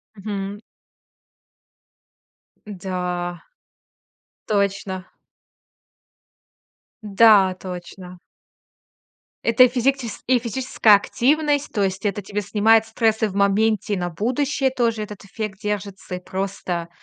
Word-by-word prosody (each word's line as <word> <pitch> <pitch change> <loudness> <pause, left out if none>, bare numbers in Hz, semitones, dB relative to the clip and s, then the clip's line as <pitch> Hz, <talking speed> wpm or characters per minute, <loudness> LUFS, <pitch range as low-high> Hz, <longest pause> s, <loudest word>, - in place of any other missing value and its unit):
Мгм. 200 0 -5 2.1
Да. 180 -3 -4 1.0
Точно. 200 -2 -1 2.0
Да, 205 -2 +5
точно. 180 0 -9 1.3
Это 230 +2 +6
и - - +7
физикчес 250 -1 -1
и 255 0 +4
физическая 235 -2 +3
активность, 290 +7 +1
то 205 -3 +1
есть 190 +1 -2
это 205 0 -1
тебе 205 +2 -4
снимает 215 +3 +3
стрессы 220 -1 +1
в 195 - -8
моменте, 205 +1 +2
и 200 - 0
на 175 0 -2
будущее 260 - 0
тоже 235 -4 0
этот 210 -1 -8
эффект 205 0 -6
держится, 200 -2 -4
и 180 - -5
просто 185 -3 -4
205 Hz, 100 wpm, -22 LUFS, 190-225 Hz, 2.1 s, и